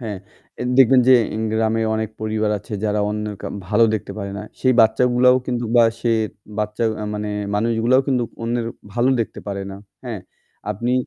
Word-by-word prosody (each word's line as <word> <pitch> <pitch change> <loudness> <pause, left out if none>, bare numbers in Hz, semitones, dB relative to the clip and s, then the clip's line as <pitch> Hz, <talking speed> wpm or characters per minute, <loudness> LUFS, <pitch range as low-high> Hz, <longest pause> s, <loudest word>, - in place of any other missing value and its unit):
হ্যাঁ, 105 -5 -5 0.4
এ - - -1 0.2
দেখবেন 130 0 +7
যে 130 - +8 0.2
ইন 110 - -2
গ্রামে 110 0 +1
অনেক 110 0 -2
পরিবার 110 0 -1
আছে 105 - -13
যারা 105 0 +1
অন্যের 105 0 -3
ক - - -14 0.3
ভালো 115 +2 +4
দেখতে 110 - -4
পারে 100 -1 -4
না - - -6 0.2
সেই 130 - +3
বাচ্চাগুলাও 125 +3 +4
কিন্তু 120 -1 -2
বা 120 - +7 0.2
সে 120 - 0 0.5
বাচ্চা 105 +2 -1 0.2
আ - - -3
মানে 105 0 -3 0.3
মানুষগুলোও 115 +4 +2
কিন্তু 130 -3 +2 0.2
অন্যের 115 0 -1 0.3
ভালো 120 +4 +1
দেখতে 115 - -4
পারে 100 -1 -3
না, 95 - -8 0.3
হ্যাঁ? 115 -5 -5 0.5
আপনি 120 +5 -2
115 Hz, 180 wpm, -21 LUFS, 105-120 Hz, 0.5 s, যে